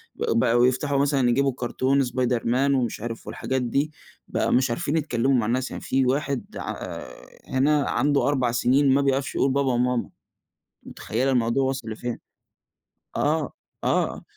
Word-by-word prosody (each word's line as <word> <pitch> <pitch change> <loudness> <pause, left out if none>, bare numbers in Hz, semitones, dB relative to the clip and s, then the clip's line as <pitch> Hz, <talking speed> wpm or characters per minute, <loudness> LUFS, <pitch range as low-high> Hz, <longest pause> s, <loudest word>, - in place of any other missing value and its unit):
بقوا 115 +1 +2
يفتحوا 140 +2 0
مثلًا 140 -3 +2
يجيبوا 135 +3 +2
الكارتون 130 +3 0
سبايدرمان 125 +2 +1
ومش 120 -5 -1
عارف، 115 0 -6
والحاجات 130 0 -2
دي، 140 +5 0 0.4
بقوا - - -1
مش 130 0 +3
عارفين 140 +6 -1
يتكلموا 135 -4 +1
مع 115 - +1
الناس. 125 +3 -1
يعني - - -6
في 130 0 +1
واحد 140 0 -1
ع - - -4
آآ، - - -8 0.2
هنا 145 +2 +2
عنده 145 +3 +2
4 130 -4 +1
سنين 130 +4 +3
ما 140 - +3
بيعرفش 135 -1 0
يقول 135 - +2
بابا 140 -1 +1
و - - +1
ماما. 125 0 0 0.7
متخيلة 125 +5 -2
الموضوع 125 +1 +2
وصل 130 -3 -2
لفين؟! 120 +2 -4 1.0
آه، 155 -1 0 0.3
آه، - - 0
130 Hz, 155 wpm, -24 LUFS, 120-140 Hz, 1.0 s, مش